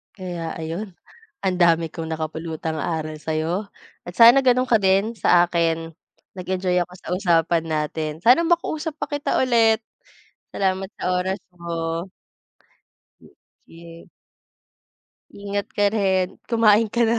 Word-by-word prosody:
Kaya 175 -4 -5
ayun, 175 +4 -5 0.5
ang 185 -1 +1
dami 170 -1 +4
kong 165 -1 -6
nakapulutang 160 0 -4
aral 155 -1 -3
sa'yo 165 +6 -2 0.3
at 175 - -10
sana 240 +4 +8
ganun 255 0 +3
ka 235 -3 +4
din 195 +4 +2
sa 175 -5 +4
akin. 165 -1 -1 0.4
Nag-enjoy 185 0 -1
ako 180 +1 -9
sa - - -13
usapan 170 -3 +1
natin. 155 0 -2
Sana 250 - +5
makausap 320 -2 -1
pa - - -3
kita 290 0 -1
ulit. 225 -3 +3 0.7
Salamat 190 -1 -1
sa - - -5 0.2
oras 190 +2 -2 0.2
mo. 165 0 -4 1.6
Sige. 165 0 -14 1.3
Ingat 200 0 -4
ka 205 - +1
rin. 190 -4 0
Kumain 225 -2 +4
ka 235 +3 0
na. 230 +1 +2
180 Hz, 125 wpm, -22 LUFS, 165-215 Hz, 1.6 s, sana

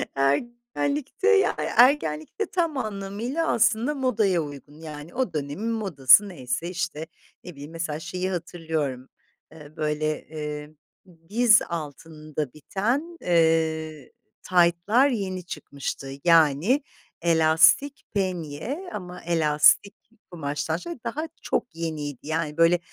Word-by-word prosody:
Ergenlikte, 240 - -1
ya 420 -3 +4
yani, - - -1
ergenlikte 245 - +3
tam 335 -6 -1
anlamıyla 215 +7 -3
aslında 235 +5 +2
modaya 215 -10 +1
uygun, 145 0 -10
yani, 150 0 -9
o 255 -6 -1
dönemin 150 +10 -3
modası 195 - +5
neyse, 145 +1 -4
işte, 170 -3 -4 0.4
ne 180 - -8
bileyim, 145 +1 -10
mesela, 165 -2 -4
şeyi 185 +3 -3
hatırlıyorum, 160 -7 -3 0.4
ııı, 150 0 -14
böyle, 155 0 -2
eee, 150 -1 -6 0.6
diz 225 0 +5
altında 155 -2 -6
biten, 245 - -2
eee, 160 -3 +1 0.3
taytlar 180 +8 +3
yeni 185 -6 -3
çıkmıştı. 140 -5 -6
Yani, 165 - +4 0.4
elastik 165 - +4
penye 190 - -3
ama 180 -2 -7
elastik 165 +4 +3 0.4
kumaştan, 150 0 -2
şöyle, 340 - -7
daha 290 +7 -3
çok 240 - -2
yeniydi. 155 -5 -4
Yani, 155 -1 -2
böyle, 165 +1 +5
170 Hz, 110 wpm, -25 LUFS, 150-225 Hz, 0.6 s, modası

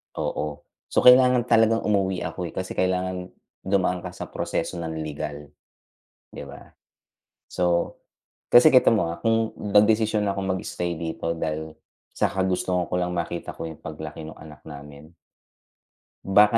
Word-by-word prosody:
Oo 75 -1 -3 0.3
so, - - +1
kailangan 125 -1 +7
talagang 115 0 +4
umuwi 95 -3 0
ako 90 - -4
eh, - - -10
kasi 95 - -4
kailangan 90 0 -1 0.4
dumaan 95 -2 +1
ka - - -6
sa - - -7
proseso 85 - -3
ng 80 -1 -4
legal, 75 -1 -6 0.8
'di - - -8
ba. - - -11 0.9
So, 85 -1 0 0.6
kasi 125 +6 +9
kita 130 - +7
mo 85 -6 0
ah, 85 - -6
kung 115 -1 +1
nagdesisyon 105 +1 +3
na 100 - +1
akong 95 0 -3
mag-stay 90 -2 -3
dito 85 0 -3
dahil 80 0 -4 0.4
sa - - +1
kagustuhan 90 -1 0
ko - - -1
lang 90 0 -1
makita 85 0 -4
ko - - -5
yung 80 - -12
paglaki 80 0 -7
nung 80 - -10
anak 75 -2 -13
namin. 75 +1 -11 1.1
Baka 105 +3 +5
90 Hz, 150 wpm, -24 LUFS, 80-105 Hz, 1.1 s, kasi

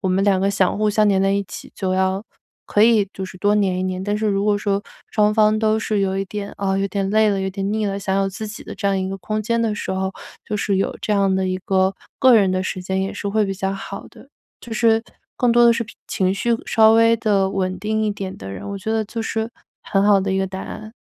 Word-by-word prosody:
我 190 - -1
们 190 +2 +2
两 195 -2 +3
个 195 +1 +2
想 195 0 +1
互 215 0 +2
相 210 +1 +3
黏 190 -1 +3
在 195 - +2
一 200 0 0
起， - - -10
就 190 -2 -2
要 190 +2 0 0.4
可 210 - +3
以 225 -3 +5
就 190 - -5
是 185 - -11
多 205 +1 +2
黏 195 -3 +1
一 - - -1
黏。 185 0 -2
但 205 +1 0
是 215 0 -1
如 200 -1 +1
果 210 -1 +3
说 200 0 -1 0.3
双 210 -1 +3
方 215 -1 +4
都 220 0 +2
是 215 -2 -1
有 190 -1 0
一 195 - -1
点， 205 0 -5
啊， 195 -1 0
有 195 - +1
点 195 0 -2
累 215 0 +4
了、 195 - 0
有 190 - -1
点 195 +1 -3
腻 220 0 0
了， 200 0 -2
想 195 -1 -1
有 195 - +1
自 215 +3 -6
己 210 - -8
的 - - -8
这 200 - -3
样 195 - +1
一 190 - -2
个 195 - -4
空 215 +4 -3
间 230 +2 0
的 225 -2 0
时 205 - -5
候， 190 0 -1 0.4
就 210 - -2
是 200 -1 0
有 - - -1
这 215 - 0
样 195 -2 +2
的 190 0 0
一 185 - -1
个， 190 0 +2 0.2
个 260 -3 +6
人 195 -4 +4
的 185 0 0
时 185 0 -4
间 190 +1 -1
也 195 - -3
是 200 - -4
会 215 +1 +2
比 195 - -2
较 195 0 -2
好 195 0 -7
的， 270 - -17 0.3
就 235 - -9
是 225 0 +3 0.3
更 245 -1 +2
多 240 0 +6
的 235 - +7
是 235 - -1
脾 215 - -14
情 185 0 0
绪 235 +4 -1 0.2
稍 220 -1 +5
微 230 0 +5
地 200 -3 +1
稳 185 -1 -2
定 215 +3 -1
一 215 - +1
点 195 -2 -5
的 95 - -8
人， 95 - -7
我 200 - -4
觉 220 +3 -4
得 220 -1 0
就 225 +2 -5
是 225 +1 -2 0.3
很 195 0 +1
好 205 -1 +5
的 190 0 -1
一 190 - +1
个 190 - 0
答 190 0 -6
案。 215 0 -8
200 Hz, 300 characters per minute, -21 LUFS, 190-215 Hz, 0.4 s, 的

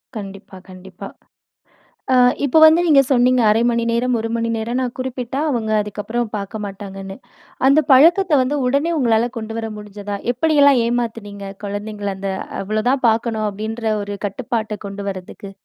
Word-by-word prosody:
கண்டிப்பா 195 -2 -9
கண்டிப்பா. 185 +1 -10 1.1
ஆ - - +5 0.3
இப்போ 280 +3 +3
வந்து 315 +2 +7
நீங்க 295 -4 +6
சொன்னீங்க 250 -1 +3
1/2 215 +2 +3
மணி 235 0 0
நேரம், 240 +1 +1
1 225 - -3
மணி 230 0 -1
நேரம் 230 +3 -2
நா 255 - 0
குறிப்பிட்டா 255 0 -4
அவங்க 230 -5 -2
அதுக்கப்புற 210 +3 -5 0.2
பார்க்க 205 +2 -6
மாட்டாங்கனு. 195 -1 -8 0.5
அந்த 280 +3 +5
பழக்கத்த 330 +4 +5
வந்து 270 +3 -1
உடனே 280 +6 +1
உங்களால 235 -3 +2
கொண்டு 225 0 -6
வர 225 0 -3
முடிஞ்சதா? 205 -1 -7 0.2
எப்படி 310 +6 0
எல்லா 285 0 +7
ஏமாத்துனீங்க 225 -4 -3 0.2
குழந்தைகள? 205 0 -4
அந்த 195 0 -3 0.3
அவ்ளோ 215 +2 -2
தான் 265 -1 0
பார்க்கனு 225 -1 0
அப்டீன்ற 220 +2 -3
ஒரு 205 0 -5
கட்டுப்பாட்ட 220 0 -3
கொண்டு 200 0 -6
வர்றதுக்கு. 190 +1 -9
225 Hz, 155 wpm, -19 LUFS, 205-250 Hz, 1.1 s, வந்து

